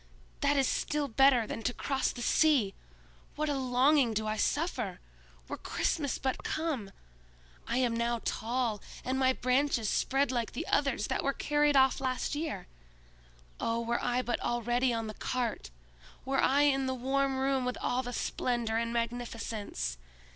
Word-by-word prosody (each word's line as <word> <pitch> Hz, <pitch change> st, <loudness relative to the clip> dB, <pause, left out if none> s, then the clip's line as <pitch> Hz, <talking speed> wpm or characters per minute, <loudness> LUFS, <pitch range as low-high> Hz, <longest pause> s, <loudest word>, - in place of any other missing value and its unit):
"That 285 Hz, 0 st, +2 dB
is 270 Hz, -, +4 dB
still 300 Hz, -1 st, 0 dB
better 265 Hz, -1 st, +4 dB
than 225 Hz, -, -5 dB
to 245 Hz, +2 st, -1 dB
cross 270 Hz, -2 st, 0 dB
the 240 Hz, -, -6 dB
sea! 270 Hz, -12 st, +3 dB, 0.6 s
What 305 Hz, 0 st, -1 dB
a -, -, +1 dB
longing 260 Hz, -1 st, +3 dB
do 215 Hz, +1 st, 0 dB
I 215 Hz, 0 st, -1 dB
suffer! 245 Hz, -, -1 dB, 0.5 s
Were -, -, -5 dB
Christmas 285 Hz, -4 st, -1 dB
but 265 Hz, -1 st, -2 dB
come! 305 Hz, -11 st, -2 dB, 0.8 s
I -, -, 0 dB
am 245 Hz, -3 st, +2 dB
now 235 Hz, 0 st, 0 dB
tall, 230 Hz, -2 st, -1 dB, 0.2 s
and 260 Hz, +1 st, 0 dB
my 260 Hz, -1 st, +4 dB
branches 255 Hz, -3 st, +1 dB
spread 275 Hz, 0 st, +1 dB
like 240 Hz, -3 st, -2 dB
the -, -, -3 dB
others 275 Hz, -7 st, +1 dB
that -, -, -1 dB
were 275 Hz, -, +1 dB
carried 295 Hz, 0 st, +2 dB
off 265 Hz, 0 st, +4 dB
last 255 Hz, +1 st, -1 dB
year! 290 Hz, -, -3 dB, 0.9 s
Oh, 230 Hz, 0 st, 0 dB
were 235 Hz, +1 st, -1 dB
I 245 Hz, +1 st, +1 dB
but 240 Hz, -, -1 dB
already 240 Hz, +2 st, +1 dB
on 225 Hz, -1 st, -1 dB
the 215 Hz, -, -5 dB
cart! 240 Hz, -, -3 dB, 0.6 s
Were 270 Hz, 0 st, +1 dB
I 280 Hz, +2 st, +4 dB
in 270 Hz, -2 st, +3 dB
the 260 Hz, -, -1 dB
warm 270 Hz, +1 st, 0 dB
room 265 Hz, 0 st, +1 dB
with 250 Hz, 0 st, -2 dB
all 250 Hz, +1 st, 0 dB
the 245 Hz, -1 st, -6 dB
splendor 235 Hz, -2 st, -1 dB
and 230 Hz, 0 st, -1 dB
magnificence! 230 Hz, -, -3 dB
250 Hz, 165 wpm, -31 LUFS, 235-275 Hz, 0.9 s, is